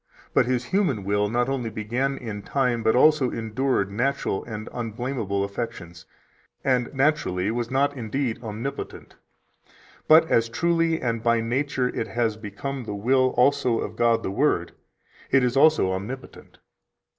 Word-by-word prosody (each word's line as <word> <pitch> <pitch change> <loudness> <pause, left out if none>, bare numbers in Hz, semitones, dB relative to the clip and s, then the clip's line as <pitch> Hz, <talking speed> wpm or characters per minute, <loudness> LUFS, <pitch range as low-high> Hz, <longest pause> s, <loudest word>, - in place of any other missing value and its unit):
But - - +3
His 125 -1 0
human 145 - 0
will 105 +1 +1
not 120 +2 +1
only 130 -4 -2
began 120 +6 -2
in 110 -4 -6
time, 125 -1 0
but 110 +1 +2
also 145 0 +5
endured 115 -2 -1
natural 125 -2 -1
and 110 -2 -6
unblamable 115 -3 -3
affections, 100 -5 -6 0.6
and 125 -2 +1
naturally 135 -10 +1
was 120 0 -2
not 140 +2 +1
indeed 120 0 -3
omnipotent; 115 +5 -6 0.9
but 160 +1 +7
as 115 -6 +2
truly 165 +4 +1
and 115 -2 -2
by 115 0 +2
nature 130 +3 0
it 115 - -3
has 115 -2 0
become 115 +5 -6
the 105 -2 -4
will 130 +5 +2
also 130 -2 +3
of 110 - -4
God 115 0 +2
the - - -2
Word, 100 - +1 0.6
it 135 -1 +4
is 125 0 +1
also 145 -9 +4
omnipotent." 110 +8 -7
120 Hz, 145 wpm, -24 LUFS, 110-135 Hz, 0.9 s, but